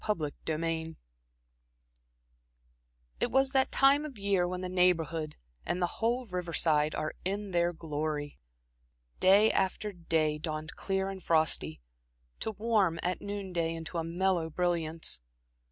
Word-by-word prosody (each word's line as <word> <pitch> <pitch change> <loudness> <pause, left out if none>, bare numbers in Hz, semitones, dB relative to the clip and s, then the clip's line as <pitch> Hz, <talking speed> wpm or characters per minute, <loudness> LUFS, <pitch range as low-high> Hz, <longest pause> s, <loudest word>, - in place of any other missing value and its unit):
Chapter 165 -9 -1 0.2
XII 160 0 -2 2.2
It - - +1
was 265 0 +3
that 265 -1 +2
time 275 +2 +5
of 290 -6 -7
year 195 -3 +1
when 180 0 -4
the 185 - -3
Neighborhood, 165 -4 +1 0.3
and 180 - -2
the 180 - +2 0.2
whole 240 +3 +1
riverside, 170 -5 +1
are 155 0 -2
in 200 +2 -2
their 175 0 +2
glory. 150 -2 -4 0.8
Day 200 +4 +6
after 195 +2 0
day 160 -3 0
dawned 155 0 -4
clear 190 0 -1
and 190 -1 -7
frosty, 155 - +1 0.6
to - - -2
warm 205 -6 +1
at 180 +1 -1
noon 200 -2 -5
day 165 -1 0
into 165 +1 -4
a - - -1
mellow 175 0 0
brilliance. 165 - 0
175 Hz, 135 wpm, -30 LUFS, 160-195 Hz, 2.2 s, Day